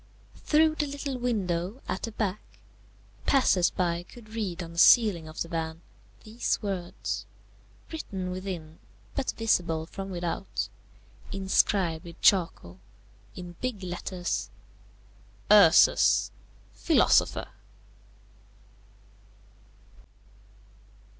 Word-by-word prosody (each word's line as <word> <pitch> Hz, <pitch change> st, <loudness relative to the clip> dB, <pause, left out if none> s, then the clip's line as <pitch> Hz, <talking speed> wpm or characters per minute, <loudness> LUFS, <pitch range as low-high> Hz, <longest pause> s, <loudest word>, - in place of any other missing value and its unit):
Through 315 Hz, +1 st, +4 dB
the 295 Hz, -, +1 dB
little 280 Hz, -2 st, -4 dB
window 200 Hz, -2 st, -2 dB
at 190 Hz, -, -3 dB
the 230 Hz, -, -4 dB
back, 210 Hz, -2 st, -2 dB, 0.9 s
passers 195 Hz, -10 st, +4 dB
by 175 Hz, -2 st, -1 dB
could 215 Hz, +5 st, -15 dB
read 200 Hz, -6 st, -4 dB
on 165 Hz, -, -9 dB
the 170 Hz, -, -4 dB
ceiling 195 Hz, -7 st, +6 dB
of 155 Hz, -, -4 dB
the -, -, -11 dB
van 165 Hz, 0 st, -4 dB, 0.4 s
these 220 Hz, +3 st, -2 dB
words, 190 Hz, -4 st, -4 dB, 0.6 s
written 190 Hz, -, -5 dB
within, 180 Hz, -4 st, -6 dB, 0.3 s
but 275 Hz, -, -2 dB
visible 175 Hz, -8 st, +1 dB
from 195 Hz, +3 st, -7 dB
without, 175 Hz, +1 st, -3 dB, 0.6 s
inscribed 190 Hz, -3 st, +1 dB
with 170 Hz, -1 st, -11 dB
charcoal, 165 Hz, -, +2 dB, 0.6 s
in 175 Hz, -1 st, -9 dB
big 245 Hz, -6 st, -3 dB
letters, 175 Hz, -, -3 dB, 1.0 s
URSUS, 200 Hz, -6 st, +6 dB, 0.4 s
PHILOSOPHER. 325 Hz, -, +2 dB
185 Hz, 95 wpm, -27 LUFS, 170-220 Hz, 1.0 s, ceiling